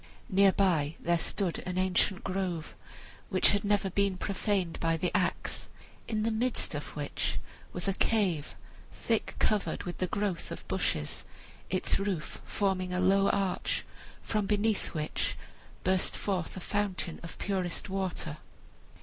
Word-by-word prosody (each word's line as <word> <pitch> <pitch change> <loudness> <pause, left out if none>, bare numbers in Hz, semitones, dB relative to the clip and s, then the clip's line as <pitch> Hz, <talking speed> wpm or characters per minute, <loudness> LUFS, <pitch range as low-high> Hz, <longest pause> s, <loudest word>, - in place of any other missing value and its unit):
Near 195 0 +6
by 165 -6 +2
there 170 0 +2
stood 185 0 0
an 180 0 -4
ancient 185 +1 +2
grove 185 -4 -2 0.5
which 185 -2 +5
had 205 -1 +1
never 205 -2 +2
been 200 0 +2
profaned 195 -3 0
by 165 0 +2
the 175 +2 -1
axe, - - 0 0.4
in 215 -2 0
the 225 - +2
midst 235 -2 +1
of 145 -1 -5
which 145 -1 -1 0.3
was 175 +2 -2
a 195 - +3
cave, 185 -8 +1 0.4
thick 225 -2 -1
covered 210 -2 +1
with 175 -2 -5
the 185 - +1
growth 200 -2 -1
of - - -7
bushes, 75 - 0 0.5
its 185 +1 +2
roof 195 -6 -2
forming 185 -2 0
a 180 - +1
low 195 +2 +4
arch, 195 -2 0 0.4
from 210 -2 0
beneath 210 -2 +1
which 155 -1 -1 0.5
burst 185 0 +2
forth 190 -3 -2
a - - -5
fountain 195 -4 -1
of 170 - -8
purest 185 -3 -1
water. 185 -5 -2
190 Hz, 145 wpm, -31 LUFS, 175-200 Hz, 0.5 s, Near